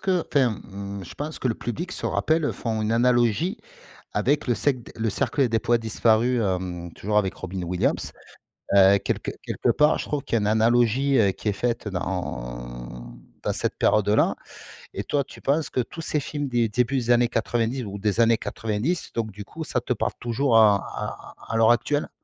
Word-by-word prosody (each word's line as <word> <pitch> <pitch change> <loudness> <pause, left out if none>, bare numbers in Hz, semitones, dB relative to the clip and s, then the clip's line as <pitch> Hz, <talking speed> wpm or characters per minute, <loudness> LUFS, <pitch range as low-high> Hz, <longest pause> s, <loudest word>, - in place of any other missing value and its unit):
qu'enfin, 160 -9 +2
mmh, 100 0 -7
je - - -11
pense 150 +2 -5
que 130 - -1
le 115 - 0
public 160 +13 -5
se - - -4
rappelle 160 -1 +1
font 110 -2 -2
une 110 +1 0
analogie 120 - +2 0.5
avec 145 0 +1
le 120 - +2
cèqu 125 +1 -1
Le 110 -1 0
Cercle 130 +5 +1
des 115 - +1
Poètes 120 +1 +1
Disparus, 115 +2 +2
hem, 90 -4 -2
toujours 105 +1 0
avec 95 -3 0
Robin 95 0 -6
Williams, 90 +1 -1 0.6
heu, 100 0 +7
quelque 100 - -3
quelque - - 0
part, 150 +1 +4
je - - -3
trouve 150 -2 -2
qu'il - - -4
y - - +4
a - - -2
une 105 - 0
analogie, 120 +5 +3
heu, 100 -4 +4
qui 105 - -4
est - - +2
faite 120 0 -2
dans 95 -3 -3
en - - -6 0.3
dans - - 0
cette - - -2
période-là 105 0 +3 0.6
et - - -4
toi, 145 -1 +1
tu - - -14
penses 145 +2 0
que - - -2
tous 145 +7 -4
ces 155 -1 -1
films 145 0 -4
des 120 -2 +2
débuts 125 +5 0
des 120 -2 0
années 120 0 +4
90 120 +1 -1
ou 100 0 -6
des 105 +2 -1
années 115 -1 +5
quatre-vingt-dix 115 +11 -3
donc 110 -2 -2
du 105 +1 -9
coup, 160 +7 -7
ça 125 - -1
te 125 +1 -1
parle - - -1
toujours 120 +1 +2
à 105 -2 +7
à - - -7 0.2
à - - +1
l'heure 115 0 +6
actuelle? 145 +5 0
115 Hz, 200 wpm, -25 LUFS, 100-130 Hz, 0.6 s, heu